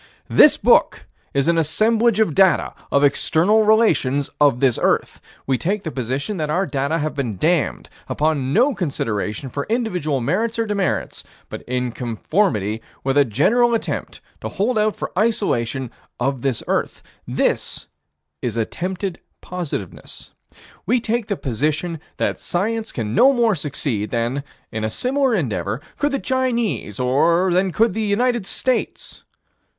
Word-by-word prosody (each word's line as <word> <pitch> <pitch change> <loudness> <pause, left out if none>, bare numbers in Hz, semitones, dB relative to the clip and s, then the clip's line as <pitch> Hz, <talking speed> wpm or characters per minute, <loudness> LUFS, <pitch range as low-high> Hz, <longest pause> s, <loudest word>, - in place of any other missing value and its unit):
This - - +7
book - - +3 0.3
is 140 +1 0
an 170 -1 +3
assemblage 220 +7 +2
of 215 -8 +2
data 190 +3 +3 0.2
of 140 - +3
external 165 +8 +3
relations 210 - +2
of 140 -4 +4
this 130 -3 +2
earth. - - 0 0.2
We 130 -2 0
take 200 +3 -1
the 160 - -4
position 135 - -3
that 155 -2 -2
our 180 +6 +1
data 140 +1 -1
have 155 -1 -2
been 125 -8 -3
damned, 165 - 0 0.2
upon 145 -4 0
no 250 - +3
consideration 115 - -2
for 140 +3 -4
individual 180 - -1
merits 205 - -1
or 230 - +1
demerits, 205 -3 -2 0.3
but - - -7
in 125 0 -1
conformity 115 - -1 0.2
with 135 0 0
a 145 - +6
general 230 - +2
attempt 225 - -4 0.2
to - - -4
hold 220 +3 0
out 215 0 +1
for - - -5
isolation 135 - 0 0.3
of 135 0 -1
this 130 -3 -1
earth. - - -2 0.2
This - - -1 0.6
is 115 -2 -3
attempted 180 - -3 0.2
positiveness. 170 - -6 0.6
We 245 +4 +3
take 230 -1 -2
the 200 - -2
position 150 +6 -2 0.2
that - - -1
science 220 +5 -2
can 110 -2 -4
no 265 - +6
more 235 -4 +3
succeed 140 - -2
than, 120 +4 -1 0.3
in 110 0 -4
a 110 - 0
similar 260 - +1
endeavor, 120 - -2 0.2
could 290 0 +1
the 275 - 0
Chinese, 245 - -1
or 170 +8 +2
than 185 +2 +2
could 220 +5 +2
the 220 - -2
United 220 +1 +1
States. 255 -2 -2
165 Hz, 150 wpm, -21 LUFS, 130-220 Hz, 0.6 s, This